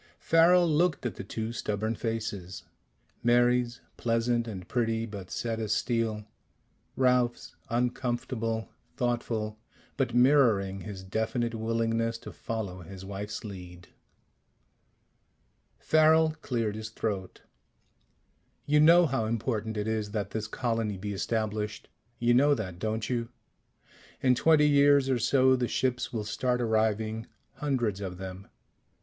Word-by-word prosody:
Farrel 170 +2 +5
looked 160 -2 +1
at 120 - -1
the - - -7
two 110 +3 -4
stubborn 110 0 -2
faces: 105 -5 -4 0.6
Mary's, 120 0 +2 0.2
pleasant 115 0 0
and 95 -5 -7
pretty, 115 -2 0
but 100 -4 -8
set 115 -1 -3
as 110 -2 0
steel; 115 -3 -1 0.7
Ralph's, 125 -2 +1
uncomfortable, 120 -2 -1 0.3
thoughtful, 115 -3 -2 0.4
but 125 -4 0
mirroring 115 -8 +4
his 95 -1 -7
definite 110 +4 -1
willingness 115 0 0
to - - -10
follow 100 -5 -5
his 95 +2 -10
wife's 100 +2 -5
lead. 90 -4 -9 1.9
Farrel 155 0 +4
cleared 115 -5 -1
his 110 0 -6
throat. 100 -4 -4 1.2
"You 150 +1 +3
know 170 +3 +7
how 135 -7 0
important 110 -1 -2
it 105 +1 -2
is 110 -2 -1
that 100 -2 -2
this 110 0 -3
colony 115 -3 -2
be 105 +2 -4
established? 105 0 -2 0.3
You 120 +1 +3
know 145 +4 +5
that, 95 -7 -6
don't 110 +1 -2
you? 120 -2 -2 0.9
In 130 -1 +4
twenty 150 +3 +4
years 140 -2 +5
or 125 - +1
so 130 +2 +4
the 125 -1 0
ships 125 0 -1
will 110 -3 -3
start 125 +4 -1
arriving. 110 -1 0 0.3
Hundreds 120 -9 -1
of 90 -2 -5
them. 95 +1 -8
115 Hz, 125 wpm, -29 LUFS, 105-125 Hz, 1.9 s, know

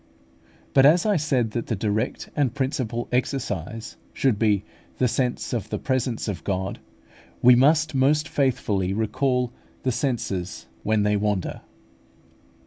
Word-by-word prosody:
But 135 - +6
as 170 +5 +4
I 210 -1 +3
said 135 -8 +1
that 120 +1 -3
the 115 - -1
direct 105 +4 -2
and 135 -4 +1
principal 130 -4 -2
exercise 115 - -2 0.2
should 125 -7 +1
be 105 -3 +2 0.3
the 130 - +3
sense 125 +1 -1
of 115 -4 -2
the - - -2
presence 130 -4 -1
of 100 -4 -4
God, 95 -1 -2 0.6
we 125 +1 +9
must 155 +5 +4
most 145 +4 +3
faithfully 105 - 0
recall 125 +3 0 0.3
the 130 - +1
senses 110 -8 -2 0.2
when 110 +3 +1
they 105 0 +2
wander. 100 -3 -1
120 Hz, 135 wpm, -24 LUFS, 105-135 Hz, 0.6 s, we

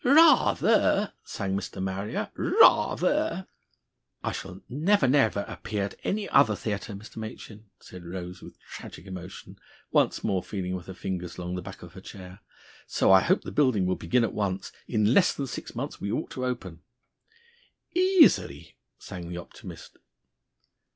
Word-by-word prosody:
"Rather!" 275 -7 +5
sang 95 -2 -3
Mr. 100 - -5
Marrier. 95 +2 -3
"Rather!" - - +3 0.8
"I - - -1
shall 95 0 -7
never, 155 +4 +2
never 125 -6 +3
appear 105 -2 -4
at 100 - -5
any 205 0 -1
other 110 -2 +5
theatre, 105 0 -4
Mr. 105 +3 -12
Machin!" 110 -1 -8
said 90 -1 -12
Rose 90 +1 -7
with - - -13
tragic 85 - -10
emotion, 95 -1 -9 0.3
once - - +2
more 95 -2 0
feeling 90 -2 -4
with 90 -1 -8
her 95 - -8
fingers 90 -2 -5
along 90 0 -4
the 90 - -3
back - - -10
of - - -12
her - - -11
chair. 95 0 -11 0.5
"So - - +2
I 95 0 +8
hope 185 - +2
the - - -6
building 130 -10 +2
will 90 0 +1
begin 105 +9 +1
at - - -1
once. 100 -2 -2 0.2
In 110 0 +2
less 185 - +4
than 140 - -3
six 125 - -7
months - - -5
we 100 - -2
ought 115 - -3
to 130 - -3
open." 95 -10 -5 1.1
"Easily!" 355 - +3 0.2
sang 90 -2 -8
the 90 - -5
optimist. 85 - -11
100 Hz, 155 wpm, -27 LUFS, 90-125 Hz, 1.1 s, I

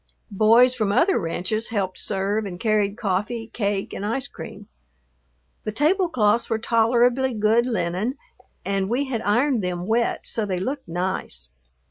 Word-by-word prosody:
Boys 230 +5 +5
from 215 -5 0
other 380 - +3
ranches 185 +5 -2
helped 195 -4 -2
serve 200 +2 -1
and 175 -2 -7
carried 210 -1 +1
coffee, 220 +3 -2
cake, 200 -3 -2
and - - -5
ice 245 +6 -1
cream. - - -10 1.0
The 215 - -3
tablecloths 280 - +2
were 225 - +1
tolerably 240 +3 +2
good 220 +3 +3
linen 220 - -1 0.5
and 195 -1 -1
we 250 +5 +1
had 245 -4 -3
ironed 235 +2 +2
them 180 -1 -3
wet 235 +3 0
so 225 - -1
they 190 -3 -2
looked 265 +7 -4
nice. 170 - -3
215 Hz, 145 wpm, -23 LUFS, 195-240 Hz, 1.0 s, Boys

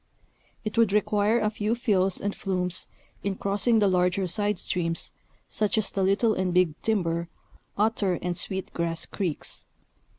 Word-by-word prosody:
It 215 +2 -1
would 225 -4 +4
require 210 +2 +2
a 215 -1 +1
few 215 +1 -1
fills 195 -6 +2
and 200 0 -2
flumes 180 -2 -1 0.4
in 200 -1 -1
crossing 205 +5 +1
the 210 -2 +4
larger 180 +1 +2
side 205 +2 0
streams, 165 -2 -1 0.4
such 215 +2 0
as 215 -3 +1
the 195 - -1
Little 200 +4 +3
and 185 -2 0
Big 180 -4 +4
Timber, 170 -6 0 0.5
Otter 205 -3 +2
and 175 0 -2
Sweet 190 +2 -2
Grass 165 -1 -2
Creeks. 180 -7 -3
195 Hz, 155 wpm, -27 LUFS, 180-210 Hz, 0.5 s, would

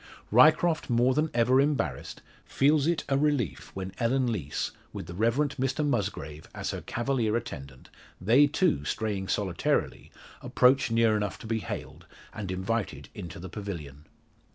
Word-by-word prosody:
Ryecroft 155 +7 +5
more 120 +2 +3
than 155 +3 +1
ever 125 +3 +4
embarrassed, 135 - -2 0.2
feels 145 +1 +2
it 170 -1 +1
a 135 0 +1
relief 140 - 0
when 95 0 -5
Ellen 125 +1 +1
Lees, 75 -9 -3 0.2
with - - -6
the 85 - -8
Rev 115 +5 +1
Mr 140 0 0
Musgrave 95 - -3
as - - -3
her - - -5
cavalier 120 -3 -1
attendant 70 - -6 0.3
they, 120 +10 +5
too, 145 - +1
straying 100 +2 -2
solitarily 95 -5 -1 0.3
approach 130 +1 +3
near 115 -1 +3
enough 105 -2 -2
to - - -12
be 110 0 -1
hailed, 100 - -7 0.3
and 105 -3 -5
invited 95 +4 -3
into 85 -1 -8
the 90 - -7
pavilion. 80 -8 -7
115 Hz, 150 wpm, -28 LUFS, 95-135 Hz, 0.3 s, Ryecroft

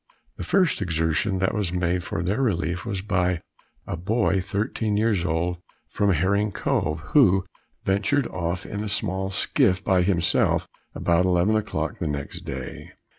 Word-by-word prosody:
The - - -5
first 185 - +2
exertion 85 +2 0
that 95 0 +1
was 105 -5 -1
made 90 0 0
for 80 - -3
their 100 +9 0
relief 90 - -1
was 100 -4 -2
by 90 -4 0 0.4
a - - -3
boy 95 +2 +1
thirteen 105 +2 -1
years 105 -5 +2
old, 85 +1 -1 0.3
from 100 -1 +2
Herring 100 +5 +1
Cove, 80 -3 -1
who 95 -10 +5 0.4
ventured 100 +8 +1
off 90 0 -3
in 105 +1 -4
a 105 - -4
small 95 -2 -1
skiff 95 0 +2
by 95 -2 +3
himself 90 -2 +2 0.3
about 85 +1 +2
eleven 90 +4 +3
o'clock 110 - -2
the - - -2
next 70 -1 -4
day. - - -7
95 Hz, 155 wpm, -24 LUFS, 85-105 Hz, 0.4 s, who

